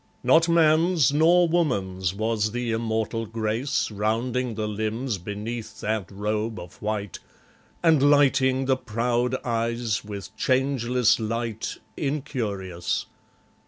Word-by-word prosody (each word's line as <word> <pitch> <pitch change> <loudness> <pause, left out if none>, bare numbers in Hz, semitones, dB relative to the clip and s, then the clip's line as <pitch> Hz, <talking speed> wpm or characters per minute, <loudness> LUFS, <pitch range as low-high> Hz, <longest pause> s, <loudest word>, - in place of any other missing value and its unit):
Not 165 +1 +5
man's 165 -2 +4
nor 170 +4 +5
woman's 95 - 0
was 110 +1 -1
the 120 -1 -2
immortal 115 0 -1
grace 115 +4 -1
Rounding 115 +4 -1
the 110 0 -2
limbs 110 +2 -2
beneath 110 +4 -6
that 110 -2 -2
robe 105 +2 -2
of 85 0 -12
white, 105 -3 -3 0.6
And 160 -4 +5
lighting 135 -2 +3
the 130 0 +2
proud 120 +1 0
eyes 115 -1 -1
with 100 -1 -8
changeless 125 -2 +2
light, 115 0 -3 0.2
Incurious. 110 - -2
115 Hz, 110 wpm, -25 LUFS, 105-130 Hz, 0.6 s, Not